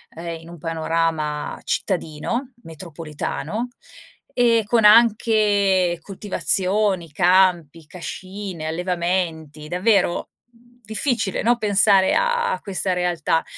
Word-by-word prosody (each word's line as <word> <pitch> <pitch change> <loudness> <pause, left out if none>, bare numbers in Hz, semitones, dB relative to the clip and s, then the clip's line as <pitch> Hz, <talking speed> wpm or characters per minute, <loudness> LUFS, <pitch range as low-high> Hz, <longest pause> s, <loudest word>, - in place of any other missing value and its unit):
ehm, 165 0 -6
in 165 - -14
un 175 - -10
panorama 160 -2 -2
cittadino, 195 - -3
metropolitano, 165 +7 -5 0.7
e 230 -2 +3
con 225 +1 +2
anche 210 -5 +4
coltivazioni, 195 -2 0
campi, 175 -2 +2
cascine, 185 +1 -7
allevamenti, 170 -3 -2
davvero 180 +1 +1 0.6
difficile, 220 -3 -1
no, 240 +1 +3
pensare 200 -3 +3
a 480 -1 +1
questa 190 -2 -1
realtà, 175 -2 0
185 Hz, 90 wpm, -21 LUFS, 165-210 Hz, 0.7 s, anche